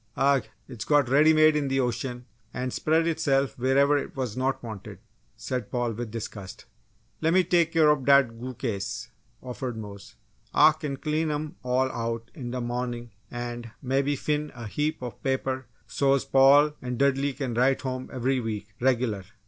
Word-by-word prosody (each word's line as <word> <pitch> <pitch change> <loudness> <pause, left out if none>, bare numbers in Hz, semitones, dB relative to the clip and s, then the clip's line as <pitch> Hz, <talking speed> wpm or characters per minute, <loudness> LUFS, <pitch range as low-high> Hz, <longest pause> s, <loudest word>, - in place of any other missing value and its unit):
"Agh! 135 0 +3 0.3
It's 120 -5 -7
got 145 -4 +3
ready 150 +4 +6
made 155 0 +5
in 145 -2 0
the 135 0 0
ocean 125 0 -2 0.3
and 125 +1 -3
spread 160 +1 +2
itself 140 -5 +1
wherever 140 +3 +3
it - - -7
was 125 -5 -3
not 130 +1 -1
wanted!" 110 -4 -8 0.4
said 125 -5 -4
Paul, 120 -1 -1
with 120 +1 -5
disgust. 105 -4 -7 0.6
"Lemme 170 +4 +4
take 170 -1 +2
care 160 -2 +5
ob 145 -3 -1
dat 135 -5 +5
goo 130 +1 -6
case!" 110 -1 -4 0.3
offered 125 -1 -5
Mose. 100 -2 -9 0.4
"Ah 155 - +7
kin 150 -3 -5
clean 155 +2 -1
'em 150 0 -3
all 130 +1 +1
out 115 0 -4
in 130 -8 -6
d' 125 +1 -3
mawnin' 120 -1 -4 0.2
an' 120 -1 -5
mebbe 135 +2 +1
fin' 150 +1 -2
a 120 -1 -7
heap 150 +6 -2
of 120 - -7
paper 130 -1 -2 0.2
so's 135 +3 +1
Paul 140 +3 +6
an' 125 -1 -4
Dudley 140 +1 +2
kin 130 -3 -3
write 130 +3 +2
home 130 -1 -4
every 130 +1 0
week, 110 -3 -4
reg'lar!" 120 -6 +1
130 Hz, 170 wpm, -26 LUFS, 120-140 Hz, 0.6 s, Ah